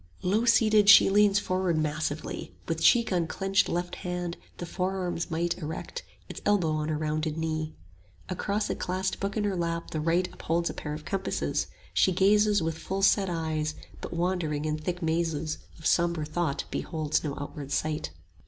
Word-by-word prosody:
Low 210 +6 +2
seated 215 -3 +5
she 205 - +9
leans 205 0 +5
forward 185 -4 0
massively, 155 0 -3
With 165 -1 -2
cheek 235 -5 +5
on 170 -2 +1
clenched 195 +4 +1
left 175 +1 -2
hand, 180 -1 -3 0.2
the 175 - -5
forearm's 180 -1 -2
might 170 +1 0
Erect, 160 - -5 0.3
its - - -8
elbow 195 -6 +2
on 155 0 -1
her 155 - 0
rounded 155 0 -1
knee; 155 -1 -2 0.5
10 185 - -3
Across 205 +3 -1
a - - -1
clasped 185 +1 -2
book 200 +2 -2
in 210 - +1
her 200 -2 0
lap 170 -1 -2
the 155 - -2
right 170 +3 +2
Upholds 170 +1 -1
a - - -9
pair 150 0 -5
of 150 - -9
compasses; 195 -1 -1 0.3
she 190 - +4
gazes 205 +1 +4
With 160 0 -2
full 195 +1 -3
set 195 -1 +4
eyes, 155 -2 -2 0.3
but - - -6
wandering 170 -4 -1
in 155 0 -1
thick 175 +3 -3
mazes 160 -1 -1 0.2
Of 160 - -13
sombre 170 -3 +2
thought 155 -2 -1
beholds 155 -3 -1
no 145 -3 -3
outward 145 -1 -7
sight. 150 - -1
170 Hz, 180 wpm, -28 LUFS, 155-190 Hz, 0.5 s, she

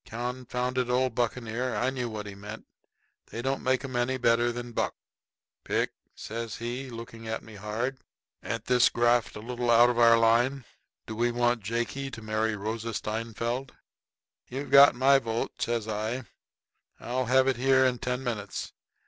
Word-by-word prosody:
Confounded 125 +1 -2
old 125 0 +2
buccaneer 120 +1 -1
I 130 +2 +1
knew 125 -3 -3
what 105 -2 -5
he 100 - -7
meant. 105 +3 -9 0.6
They 115 - -6
don't 135 +1 -1
make 130 0 +1
them 135 -2 -6
any 120 +2 +1
better 120 -1 +3
than 120 0 -6
Buck. - - -1 0.7
"Pick," - - 0 0.2
says 115 0 -5
he, 125 +3 -5
looking 115 -1 -9
at 110 - -3
me 110 - -13
hard, 110 +6 -3 0.4
"ain't 115 -1 -4
this 125 -1 +5
graft 120 0 +2
a 105 - -7
little 120 +1 -3
out 120 +1 +7
of 120 - -2
our 115 -1 +7
line? 120 +3 +3 0.4
Do 110 - -6
we 120 +2 +1
want 120 -1 +1
Jakey 120 +6 -2
to 115 - -8
marry 110 0 0
Rosa 110 +2 -4
Steinfeld?" 115 +4 -3 0.7
"You've 135 +3 -6
got 140 -1 +9
my 135 +2 +5
vote," 115 -2 -3
says 115 -2 -1
I. 110 +4 -2 0.8
"I'll 125 +2 -2
have 130 +2 +4
it 130 -3 +2
here 130 +1 +4
in 125 -2 +1
ten 125 +2 -2
minutes." 105 -5 -4
120 Hz, 165 wpm, -28 LUFS, 115-125 Hz, 0.8 s, got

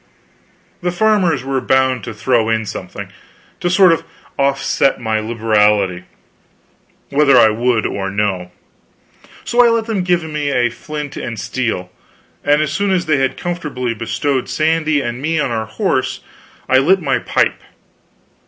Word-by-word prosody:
The 175 0 -1
farmers 180 - +2
were 135 -1 -1
bound 130 -2 +1
to 120 - -6
throw 115 +1 +1
in 110 0 0
something, - - -7 0.5
to 175 - -1
sort 185 0 +6
of 165 - -2 0.3
offset 135 0 +1
my 110 -2 -1
liberality, 105 -4 +1 1.1
whether 140 -2 +4
I 110 - +7
would 115 +1 0
or 95 -1 -2
no; 95 -3 -2 0.9
so 245 +1 +4
I 240 - +5
let 230 -1 +1
them 220 -4 -1
give 175 -2 +1
me 150 -2 -3
a 125 -3 +1
flint 150 +4 -7
and 115 -4 -5
steel; 110 -4 -3 0.5
and 145 +1 +3
as 150 - -2
soon 200 +4 0
as 185 -2 +1
they 155 -2 +2
had 135 -1 0
comfortably 150 -9 -3
bestowed 130 +4 -2
Sandy 155 -1 +1
and 120 0 -4
me 160 +2 0
on 140 -4 0
our 110 -1 -2
horse, 130 - -1 0.5
I 130 - +5
lit 185 +8 +3
my 135 -6 0
pipe. - - 0
135 Hz, 155 wpm, -17 LUFS, 115-160 Hz, 1.1 s, I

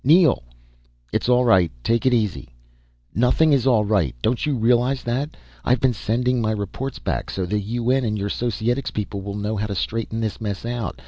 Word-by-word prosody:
"Neel!" 160 - +5 0.7
"It's - - 0
all 125 0 +4
right. 95 -8 +4
Take 115 - +1
it - - +5
easy 105 - -1 0.3
" - - -39
"Nothing 125 - +3
is 135 -2 +2
all 110 -5 +4
right 100 - +1
don't 120 +6 +1
you 145 - +1
realize 125 +3 +2
that. 130 +6 -2 0.3
I've 125 0 +2
been 130 0 +2
sending 125 +3 0
my 110 -1 +1
reports 110 +6 -4
back, - - -3
so 95 - -2
the 105 +4 -1
UN 120 +5 0
and 105 -2 -1
your 100 0 -2
Societics 120 +4 -1
people 100 -1 -4
will 100 +1 -5
know 105 +1 -2
how 105 +1 -1
to 100 - -4
straighten 115 +3 -2
this 110 0 -3
mess 105 -1 -4
out. 120 -4 -3
115 Hz, 200 wpm, -22 LUFS, 100-125 Hz, 0.7 s, Neel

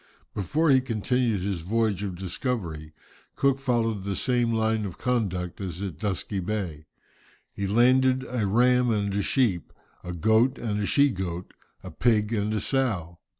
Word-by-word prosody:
Before 145 - +1
he 130 -1 +5
continued 120 -2 0
his 95 -2 -2
voyage 105 +1 0
of 100 -3 -3
discovery, 90 - -4 0.4
Cook 135 -1 +2
followed 115 -6 0
the 100 0 -2
same 120 0 +1
line 110 -1 +1
of 95 -3 -6
conduct 100 -8 -2
as 90 -3 -5
at 95 -5 -5
Dusky 100 -1 -2
Bay. 90 -6 -4 0.7
He 100 - -3
landed 130 +4 +3
a 120 -5 -1
ram 125 +4 +3
and 100 -3 0
a 100 - 0
sheep, 105 -6 0 0.3
a 90 - -5
goat 110 - +3
and 105 -3 -2
a 100 - -1
she 140 -1 +4
goat, 90 -3 -5 0.3
a - - -8
pig 110 -2 +1
and 105 -1 0
a 110 - 0
sow. 100 -11 -1
105 Hz, 160 wpm, -26 LUFS, 95-125 Hz, 0.7 s, he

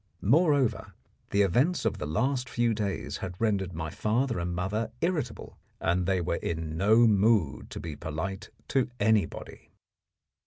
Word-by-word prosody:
Moreover, 140 - +2 0.3
the 100 0 +3
events 130 - +2
of - - 0
the 75 - -3
last 130 - 0
few 120 -1 +1
days 105 -3 -3
had 90 -2 -6
rendered 100 -5 0
my 80 -1 -4
father 115 +4 0
and 85 0 -2
mother 100 +6 -2
irritable, 155 -9 -3 0.2
and 90 +2 0
they 95 -1 +2
were 85 0 -1
in 80 -1 -3
no 110 +7 +5
mood 105 -6 +2
to - - -7
be 80 -3 -6
polite 95 +7 -5 0.2
to 135 -2 +1
anybody. 105 0 0
105 Hz, 150 wpm, -28 LUFS, 90-120 Hz, 0.3 s, no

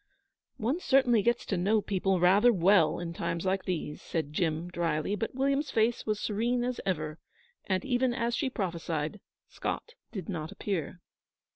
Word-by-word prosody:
'One 250 +10 0
certainly 260 - +4
gets 235 +3 +1
to 195 - -1
know 205 +5 +3
people 195 -2 0
rather 195 +7 +6
well 180 -5 +4
in 170 -1 -4
times 170 +1 -3
like 190 0 0
these,' 160 -4 -3
said 155 -3 -3
Jim, 160 +1 0
drily; 170 +1 -1
but 225 +4 -4
William's 275 +2 +1
face 225 -1 +1
was 215 -1 0
serene 235 +4 0
as 250 0 -2
ever, 155 -4 -2 0.5
and, 190 +3 0
even 255 -1 +2
as 235 -1 -1
she 270 +2 0
prophesied, 170 -5 -3 0.3
Scott 475 - -4 0.2
did 190 -7 -6
not 160 -3 -4
appear. 185 -4 -3
195 Hz, 160 wpm, -30 LUFS, 170-235 Hz, 0.5 s, rather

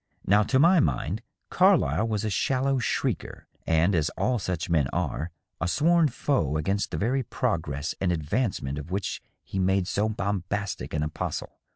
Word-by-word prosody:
Now, 105 +2 +5
to 130 +5 +2
my 170 +6 +6
mind, 85 - 0 0.3
Carlyle 185 - +4
was 110 -1 -1
a 105 - -1
shallow 135 +5 +1
shrieker, 120 - -2 0.2
and, 80 +4 +3
as 80 -3 +2
all 125 -2 +1
such 90 -3 -3
men 80 -6 +2
are, 80 +5 -2 0.3
a 95 - 0
sworn 165 - +4
foe 120 - 0
against 95 +7 -1
the - - -4
very 125 +6 +1
progress 80 - -2
and 95 -2 +2
advancement 80 - -1
of 75 - -8
which 95 +1 -3 0.2
he 95 - -4
made 95 0 +2
so 105 +2 0
bombastic 100 -3 -3
an 75 - 0
apostle. 75 +1 -4
100 Hz, 165 wpm, -27 LUFS, 80-120 Hz, 0.3 s, my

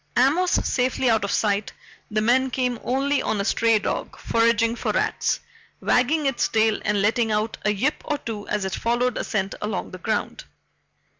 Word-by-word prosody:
Amos 300 +9 +3 0.2
safely 255 -1 +1
out 220 -2 +2
of 200 - -2
sight, 205 -1 0 0.4
the 215 0 0
men 260 +3 +3
came 250 -2 -1
only 275 +3 +1
on 215 - -1
a 200 - -1
stray 230 +1 +3
dog 205 - -3
foraging 230 0 +2
for - - -2
rats, - - 0 0.4
wagging 290 +5 +2
its 270 -3 +1
tail 220 -1 +1
and 210 -2 +1
letting 225 +1 +2
out 215 +1 -1
a 210 - +3
yip 255 +9 -1
or 295 - -1
two 215 -6 -6
as 205 -2 -1
it 190 - -3
followed 240 +1 0
a - - -2
scent 195 -2 -2
along 210 -1 -3
the 185 - -8
ground. 215 +2 -3
230 Hz, 180 wpm, -23 LUFS, 210-255 Hz, 0.4 s, Amos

